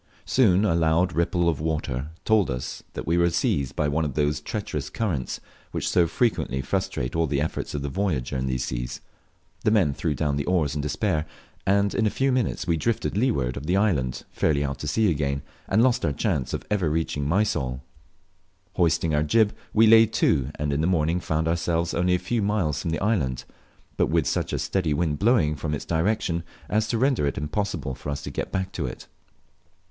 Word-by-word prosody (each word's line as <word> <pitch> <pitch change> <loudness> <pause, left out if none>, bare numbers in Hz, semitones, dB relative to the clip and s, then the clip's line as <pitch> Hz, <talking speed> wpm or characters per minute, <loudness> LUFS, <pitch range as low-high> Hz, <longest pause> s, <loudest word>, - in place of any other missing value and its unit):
Soon 105 -6 +4
a 95 - +2
laud 85 +2 +2
ripple 85 +1 +1
of 80 -3 0
water 75 -4 -2 0.2
told 110 -6 +3
us 60 -1 -4 0.2
we 85 +3 +2
were 85 0 +4
seized 70 -5 0
by 75 - +1
one 75 +3 0
of 70 -4 -3
those 75 0 +1
treacherous 75 -6 -4
currents 85 - -2 0.3
which - - -3
so 85 -2 +3
frequently 95 - 0
frustrate 60 0 -2
all 80 0 +2
the 70 -1 0
efforts 75 0 -3
of 70 - -3
the - - -2
voyager 75 -6 -1
in 65 0 -1
these 65 0 -1
seas; - - -4 0.6
the - - +3
men 95 -10 +3
threw 75 +1 -1
down 75 -2 0
the 70 - -2
oars 85 -6 +1
in 75 - -2
despair, 75 +1 -1 0.4
and 100 +1 +3
in 110 - +2
a - - +3
few 135 +5 +1
minutes 125 -6 0
we 85 -3 +1
drifted 115 +7 -1
to 100 - 0
leeward 70 - +1
of 70 +2 -6
the 90 +2 +2
island 75 - +1
fairly 75 -2 +1
out 70 -1 -3
to 75 - -5
sea 110 +9 +2
again, 70 -2 -1 0.2
and 110 +4 +3
lost 125 -2 +2
our 85 - +2
last 70 - -6
chance 65 - 0
of - - -4
ever 95 -6 +1
reaching 75 -2 -1
Mysol! 70 -9 0 0.9
Hoisting 80 -2 +2
our 75 - +3
jib, 105 +8 +3 0.2
we 110 +1 +5
lay 110 0 +7
to, 75 - +1
and 75 -1 -1
in 70 - 0
the 80 - +2
morning 85 -1 +1
found 80 -2 -1
ourselves 85 0 0
only 90 +1 +2
a - - +2
few 110 +6 -1
miles 95 -8 0
from - - -3
the 80 - 0
island, 75 - 0 0.5
but - - +3
wit, - - +2
such - - -1
a - - -1
steady 85 -6 0
wind 75 -2 0
blowing 105 -9 +3
from 75 +1 -2
its - - -6
direction 85 0 0 0.3
as 110 +1 +1
to 115 - 0
render 130 - +2
it 70 - -2
impossible 75 -1 -2
for 70 +3 -7
us 70 0 -3
to - - -5
get - - -4
back 95 0 -2
to 75 -7 -3
it. - - -8
80 Hz, 210 wpm, -25 LUFS, 70-100 Hz, 0.9 s, lay